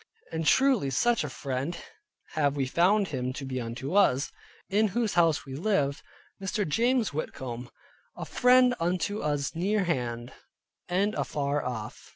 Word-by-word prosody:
And 160 Hz, -1 st, -2 dB
truly 260 Hz, -, +4 dB
such 235 Hz, -, +2 dB
a 150 Hz, -, -4 dB
friend 135 Hz, +5 st, -3 dB, 0.5 s
have 145 Hz, -3 st, +1 dB
we 140 Hz, -2 st, 0 dB
found 185 Hz, +8 st, +3 dB
him 130 Hz, -3 st, -2 dB
to 135 Hz, +1 st, -6 dB
be 130 Hz, -1 st, -3 dB
unto 120 Hz, +6 st, -5 dB
us, 145 Hz, -9 st, +3 dB, 0.4 s
in 215 Hz, +2 st, +2 dB
whose 230 Hz, -4 st, +1 dB
house 165 Hz, -3 st, +3 dB
we 135 Hz, -, -8 dB
lived, 145 Hz, -3 st, 0 dB, 0.4 s
viz. 195 Hz, -1 st, -4 dB
Mr. 210 Hz, -5 st, 0 dB
James 230 Hz, -, +1 dB
Whitcomb, 125 Hz, -5 st, -5 dB, 0.5 s
a -, -, -5 dB
friend 250 Hz, 0 st, +5 dB
unto 180 Hz, +5 st, -1 dB
us 145 Hz, -2 st, -1 dB
near 195 Hz, +5 st, +1 dB
hand, 120 Hz, -7 st, -2 dB, 0.6 s
and 195 Hz, +4 st, +1 dB
afar 140 Hz, +1 st, -1 dB
off. 110 Hz, -4 st, -6 dB
155 Hz, 155 wpm, -28 LUFS, 135-205 Hz, 0.6 s, friend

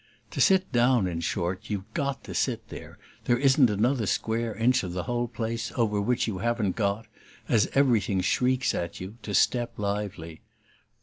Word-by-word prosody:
To -, -, -2 dB
sit 190 Hz, -1 st, +4 dB
down, 120 Hz, -3 st, +3 dB
in 85 Hz, -2 st, -3 dB
short, 85 Hz, +2 st, -3 dB
you've 100 Hz, -3 st, -2 dB
GOT 140 Hz, -4 st, -2 dB
to -, -, -8 dB
sit -, -, -1 dB
there; -, -, -10 dB, 0.3 s
there 120 Hz, -, +3 dB
isn't 135 Hz, -1 st, +4 dB
another 110 Hz, +3 st, +1 dB
square 115 Hz, +1 st, -1 dB
inch 125 Hz, +3 st, +3 dB
of 90 Hz, -3 st, -5 dB
the 90 Hz, -1 st, -3 dB
whole 120 Hz, +2 st, -1 dB
place 115 Hz, 0 st, -4 dB
over 105 Hz, -4 st, +1 dB
which 125 Hz, +4 st, +1 dB
you 100 Hz, -5 st, -3 dB
haven't 115 Hz, -3 st, 0 dB
got, 105 Hz, 0 st, -1 dB, 0.4 s
as 110 Hz, -, +3 dB
everything 115 Hz, -8 st, +3 dB
shrieks 130 Hz, +6 st, +1 dB
at 85 Hz, -1 st, -4 dB
you, 95 Hz, +5 st, -8 dB
to 100 Hz, -, -4 dB
step 120 Hz, +5 st, +2 dB
lively. 100 Hz, -6 st, -4 dB
110 Hz, 175 wpm, -27 LUFS, 100-120 Hz, 0.4 s, sit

